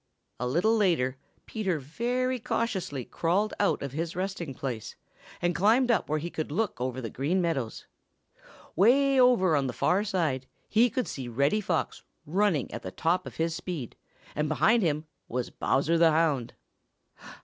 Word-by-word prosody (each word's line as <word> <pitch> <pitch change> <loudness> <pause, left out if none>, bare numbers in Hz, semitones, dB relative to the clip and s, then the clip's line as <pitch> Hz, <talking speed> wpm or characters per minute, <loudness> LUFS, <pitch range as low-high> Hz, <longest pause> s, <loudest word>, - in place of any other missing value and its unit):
A 125 - -1
little 180 - +2
later 165 - +2 0.3
Peter 195 -7 -1
very 245 - -1
cautiously 190 - -2
crawled 190 +6 0
out 200 - +1
of 140 - -4
his 165 +4 -3
resting 180 -6 -3
place 120 -5 -5 0.5
and 175 0 +2
climbed 235 +7 +3
up 230 - +1
where 155 - +1
he 170 +3 -4
could 155 -2 -4
look 195 - -1
over 130 0 -2
the 115 -3 -4
Green 150 +8 0
Meadows. 155 -10 -2 0.9
Way 270 - +4
over 235 -10 +5
on 140 -2 +1
the 125 - -3
far 190 - +2
side 160 -11 -1 0.2
he 230 +3 +4
could 255 +2 -2
see 130 -3 -5
Reddy 140 - +1
Fox 175 -5 -2 0.2
running 175 - +1
at - - -5
the 95 - -6
top 165 - 0
of - - -9
his 165 0 0
speed, 160 -11 -5 0.4
and 150 0 -1
behind 220 +9 +3
him 155 -3 0 0.2
was 125 0 -3
Bowser 160 +5 +1
the 165 -1 +6
Hound. 155 -6 +1
170 Hz, 165 wpm, -28 LUFS, 140-210 Hz, 0.9 s, the